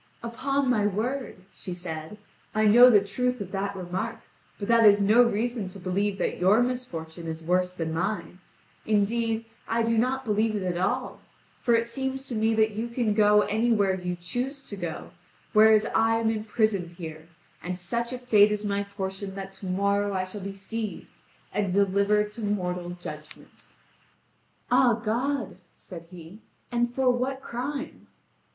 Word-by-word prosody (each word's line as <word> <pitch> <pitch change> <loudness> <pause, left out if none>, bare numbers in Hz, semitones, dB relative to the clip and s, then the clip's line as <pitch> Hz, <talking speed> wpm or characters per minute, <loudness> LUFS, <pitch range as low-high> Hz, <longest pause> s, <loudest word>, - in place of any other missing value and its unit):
"Upon 275 +4 -1
my 215 -5 +3
word," 225 0 -3
she 180 - -6
said, 160 +1 -6 0.4
"I 215 0 +3
know 240 +4 +8
the 205 -4 +5
truth 250 +4 -1
of 195 -2 -6
that 200 0 -2
remark; 185 +5 -4 0.4
but 200 - -5
that 230 0 +5
is 205 -1 +7
no 210 +4 +5
reason 235 -2 0
to 185 +1 -9
believe 195 +2 -1
that - - -2
your 200 +6 +5
misfortune 170 -10 -5
is 160 0 -5
worse 180 +2 +1
than 165 -3 -4
mine. 180 +2 -3 0.4
Indeed, 225 +2 0 0.2
I 230 +1 +1
do 230 0 +2
not 260 +2 0
believe 215 0 +1
it 200 - -2
at 175 -1 -2
all, 250 +7 -1 0.4
for 235 - +3
it 230 0 +1
seems 265 +2 -3
to - - -4
me 220 +1 +2
that 220 0 +3
you 220 +3 -3
can 235 -3 0
go 210 0 +5
anywhere 215 -2 +2
you 180 -1 -3
choose 250 +10 -4
to 205 - -5
go, 175 -4 -6 0.4
whereas 215 0 +6
I 225 0 +3
am 225 0 +1
imprisoned 215 -4 0
here, 160 -2 -9 0.3
and 180 +1 -4
such 235 +7 -2
a 255 - -3
fate 215 -4 +4
is 210 0 -2
my 200 0 0
portion 195 -1 -5
that 195 0 -7
to 190 - -7
morrow 200 +2 +1
I 185 - 0
shall 185 +2 -7
be 195 +1 -5
seized 210 +2 -6 0.3
and 200 -3 0
delivered 200 +2 +2
to 225 - -9
mortal 180 -4 -2
judgment." 150 -2 -10 1.0
"Ah, 250 -1 +5
God!" 235 +1 -2 0.2
said 170 -2 -11
he, 175 +2 -12 0.3
"and 240 0 +1
for 255 0 +2
what 255 +2 -2
crime?" 275 +5 -5
210 Hz, 170 wpm, -26 LUFS, 190-235 Hz, 1.0 s, know